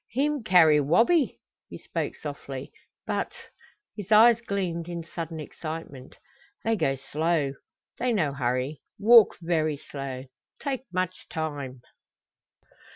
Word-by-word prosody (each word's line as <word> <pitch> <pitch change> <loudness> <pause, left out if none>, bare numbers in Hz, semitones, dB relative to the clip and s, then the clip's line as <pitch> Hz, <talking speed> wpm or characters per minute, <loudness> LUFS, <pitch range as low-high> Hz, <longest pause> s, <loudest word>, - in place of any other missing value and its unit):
"Heem 280 +2 0
carry 165 -7 +6
Wabi," 235 - +3 0.3
he - - -8
spoke - - -4
softly. - - -7 0.3
"But - - -2 0.3
" 420 - -33
His 205 -1 -8
eyes 230 +2 +7
gleamed 185 -6 -2
in 170 -1 -4
sudden 165 -1 -6
excitement. 155 -3 -7 0.5
"They 225 0 +2
go 135 -9 +1
slow! 150 +1 -1 0.5
They 250 0 +1
no 160 -11 +1
hurry! 130 +2 -2 0.2
Walk 225 0 +7
very 155 -3 +1
slow! 135 -2 -6 0.4
Take 265 -2 -3
much 185 0 -3
time!" 145 -5 -4
165 Hz, 120 wpm, -27 LUFS, 145-215 Hz, 0.5 s, eyes